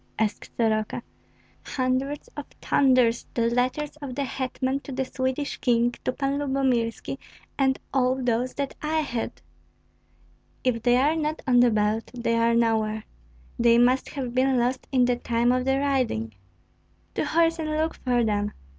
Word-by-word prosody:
asked 215 -1 -1
Soroka. 220 0 0 0.6
"Hundreds 265 +2 -1
of 290 -1 -6
thunders! 255 -4 +3
the 230 - +2
letters 255 +5 -1
of 280 -4 -7
the 280 - -1
hetman 260 0 -2
to 280 - -10
the 265 0 -1
Swedish 260 +2 -2
King, 240 -1 +2
to - - 0
Pan 275 +1 -1
Lyubomirski, 265 -3 -1 0.4
and 265 -1 +2 0.2
all 255 -1 +3
those 245 0 0
that 280 -1 -3
I 315 +1 0
had." 245 - -4 1.2
"If 245 -3 +1
they 245 +1 +4
are 290 +5 +3
not 310 0 -2
on 245 -2 +4
the 245 0 +6
belt, 215 0 0
they 230 -1 0
are 230 0 +3
nowhere. 220 -2 +1 0.6
They 235 0 +5
must 250 +2 +3
have 255 -4 -4
been 260 +1 +2
lost 250 +2 0
in 255 -2 +4
the 245 0 +1
time 240 0 +1
of 255 0 +1
the 270 0 +2
riding." 255 - 0 0.8
"To - - -1
horse 330 +2 +2
and 310 -1 -2
look 310 +1 0
for 245 -2 0
them!" 205 -1 0
255 Hz, 160 wpm, -25 LUFS, 235-275 Hz, 1.2 s, the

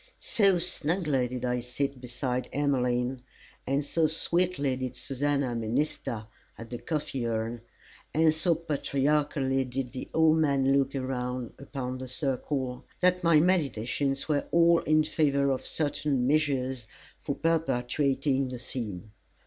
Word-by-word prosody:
So 195 -4 +3
snugly 165 -5 0
did 125 0 -4
I 125 0 0
sit 125 +2 -3
beside 125 0 -3
Emmeline, 125 -3 +1 0.5
and 140 +2 +1
so 160 +1 +2
sweetly 165 -3 +1
did 130 -1 -4
Susannah 140 -1 -1
minister 115 -1 -2 0.3
at 115 +1 -10
the 120 - -4
coffee 150 -6 -2
urn, 115 +1 -2 0.5
and 160 0 +4
so 165 +2 +2
patriarchally 145 -3 0
did 125 0 -4
the 130 - -6
old 160 0 +4
man 140 -3 +3
look 135 0 +1
around 125 -2 -3
upon 130 -2 -5
the 130 - -6
circle, 130 -1 -2 0.2
that 180 0 +3
my 165 -2 +6
meditations 140 -5 0
were 145 -2 +1
all 170 0 +5
in 155 0 +3
favour 140 -3 +2
of 130 - -2
certain 145 -4 0
measures 130 -4 +1 0.3
for 140 - -3
perpetuating 135 -3 +1
the 125 0 -5
scene. 110 -5 -6
135 Hz, 135 wpm, -28 LUFS, 125-155 Hz, 0.5 s, my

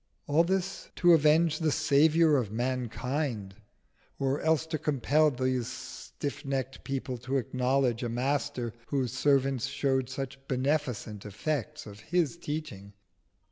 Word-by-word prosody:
All 150 +3 +4
this 190 +2 -2
to 175 -1 +6
avenge 155 +1 +4
the 160 -2 +1
Saviour 155 +1 +4
of 115 -6 -1
mankind, 125 -2 -2 0.6
or 135 +1 0
else 160 -1 +2
to 160 -1 -3
compel 150 +2 +2
these 130 -2 -1
stiff 130 +3 -6
necked 135 -1 -3
people 130 -2 -3
to 130 +3 -1
acknowledge 125 0 +1
a 120 - -2
Master 130 -1 -1
whose 130 -4 -1
servants 135 -2 +2
showed 135 -3 0
such 135 0 -5
beneficent 130 -6 -1
effects 150 +8 -3
of 105 -1 -10
His 170 +6 0
teaching. 150 - -6
135 Hz, 130 wpm, -29 LUFS, 125-150 Hz, 0.6 s, to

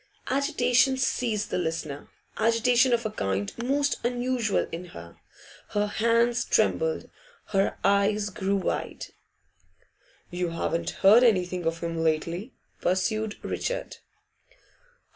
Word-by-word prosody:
Agitation 260 -1 +2
seized 230 -5 -1
the - - 0
listener, 160 -4 -4 0.3
agitation 235 +3 +3
of 235 -1 +1
a 215 - -1
kind 95 - -2
most 280 +4 0
unusual 245 -2 0
in 170 +2 -6
her. 85 - -12 0.6
Her 205 0 +2
hands 230 +3 +2
trembled, 485 -1 +1 0.4
her 195 -1 +1
eyes 200 +1 +2
grew 195 +2 -1
wide. 190 - -3 1.3
'You 175 0 -2
haven't 165 0 -2 0.2
heard 220 +5 +8
anything 180 -6 +2
of 165 0 -2
him 165 -1 -3
lately?' 165 - -1 0.3
pursued 205 +4 0
Richard. - - -3
210 Hz, 110 wpm, -26 LUFS, 175-245 Hz, 1.3 s, heard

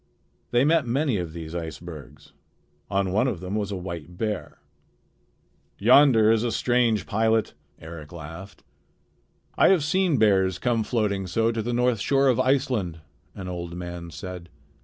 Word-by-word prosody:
They 120 +2 +3
met 155 -3 +3
many 130 -1 +1
of 85 -3 -4
these 80 -1 -8
icebergs. 80 -2 -8 0.6
On 100 -2 0
one 110 +7 +2
of 105 -9 -2
them 90 +2 -6
was 105 -1 -2
a - - -2
white 90 -2 -7
bear. 105 -1 -3 1.2
"Yonder 115 -1 +6
is 115 -1 +3
a 120 - 0
strange 120 -5 +1
pilot," 110 +1 +1 0.3
Eric 80 -2 -10
laughed. 85 +4 -10 1.0
"I - - +7
have 185 -6 +4
seen 180 -1 +1
bears 95 -4 +3
come 115 +3 0
floating 105 -5 -1
so 115 +5 +1
to 115 -1 -2
the 120 +3 -3
north 125 -1 +1
shore 135 +5 +2
of 125 - +2
Iceland," 130 - 0 0.3
an 95 - -7
old 85 -1 -5
man 85 -1 -7
said. 90 +1 -8
105 Hz, 155 wpm, -25 LUFS, 90-120 Hz, 1.2 s, I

